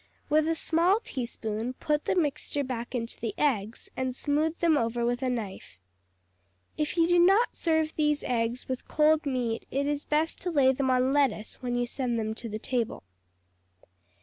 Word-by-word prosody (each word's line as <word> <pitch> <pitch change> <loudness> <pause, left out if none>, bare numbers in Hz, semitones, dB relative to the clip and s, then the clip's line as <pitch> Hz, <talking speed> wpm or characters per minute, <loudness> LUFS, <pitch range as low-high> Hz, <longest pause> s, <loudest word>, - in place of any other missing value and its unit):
With 310 +1 +4
a 330 - +1
small 340 +6 +2
teaspoon, 235 -2 -4
put 300 +3 -1
the - - +1
mixture 295 -3 0
back 250 -1 -4
into 230 -1 -3
the 220 -3 -3
eggs 230 -6 0
and 260 -1 -2
smooth 305 +4 0
them 335 -2 +3
over 235 -2 0
with 245 +1 0
a 260 - 0
knife. 215 - -5 1.0
If 305 +3 -2
you 335 - +5
do 350 0 +4
not 390 +7 +4
serve 320 -2 +1
these 300 -1 +1
eggs 235 0 -1
with 260 -1 -4
cold 310 0 +3
meat 245 -4 -2
it 275 +2 -1
is 290 0 -2
best 310 +2 0
to 360 - -2
lay 280 -6 +4
them 265 0 0
on 255 +1 +3
lettuce 265 -7 0
when 245 -1 -2
you 245 0 +1
send 240 -1 -2
them 220 -1 -1
to 230 +1 -6
the 215 - -4
table. 235 - -2
265 Hz, 180 wpm, -28 LUFS, 235-305 Hz, 1.0 s, you